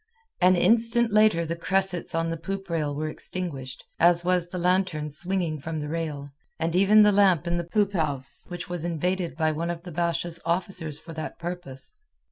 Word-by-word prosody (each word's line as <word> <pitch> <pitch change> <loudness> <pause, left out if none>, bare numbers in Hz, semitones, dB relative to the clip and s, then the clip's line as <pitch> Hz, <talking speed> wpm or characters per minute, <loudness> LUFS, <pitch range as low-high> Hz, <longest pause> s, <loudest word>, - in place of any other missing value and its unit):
An 185 +1 +6
instant 230 +4 +3
later 215 -6 +4
the 165 +1 -2
cressets 185 0 0
on 165 0 0
the - - -1
poop 195 +2 -5
rail 150 -3 -1
were 155 +2 -2
extinguished, 150 -6 -5
as 175 0 +4
was 180 -1 +2
the 180 - -6
lantern 180 -4 +1
swinging 175 0 -2
from 160 +3 -4
the 150 0 -4
rail, 150 -3 -4 0.3
and 165 +1 -1
even 205 +3 +6
the 210 - +6
lamp 195 -6 +4
in 170 0 0
the 170 - -1
poop 200 +4 0
house 145 -6 -2
which 175 -1 -6
was 175 -2 -4
invaded 175 +1 -1
by 160 -1 +2
one 165 +3 -3
of 170 -1 -4
the 180 - -8
Basha's 170 0 -1
officers 170 -4 -2
for 165 - -10
that 155 0 -6
purpose. 170 - -6
170 Hz, 190 wpm, -26 LUFS, 160-185 Hz, 0.3 s, An